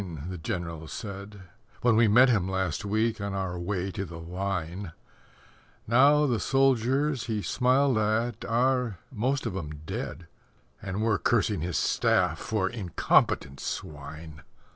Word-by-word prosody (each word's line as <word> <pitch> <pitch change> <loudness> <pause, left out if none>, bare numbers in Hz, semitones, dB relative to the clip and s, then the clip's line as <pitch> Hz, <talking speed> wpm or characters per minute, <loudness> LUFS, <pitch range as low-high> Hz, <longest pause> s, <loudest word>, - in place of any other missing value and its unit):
the 90 -2 -6
General 85 -1 -4
said 100 0 -7 0.4
When 120 -2 +4
we 115 0 +5
met 120 +6 +7
him 100 -7 +2
last 95 0 -1
week 110 +2 0
on 100 -1 -3
our 90 -2 -3
way 95 +1 -2
to 95 - -4
the 85 -3 -8
Line, 90 0 -4 0.9
Now 140 +6 +5
the 120 -6 +1
soldiers 135 +1 +2
he 110 -3 -2
smiled 130 -1 +2
at 110 +1 0
are 125 -2 +1
most 130 +3 -1
of 110 -5 -3
'em 75 -5 -6
dead, 85 - -5 0.6
And 95 +3 -3
we're 110 -3 +2
cursing 105 -6 +1
his 85 +1 -2
staff - - +2
for 105 -4 -1
incompetent 90 - +1
swine. 75 +1 -7
105 Hz, 140 wpm, -28 LUFS, 90-120 Hz, 0.9 s, met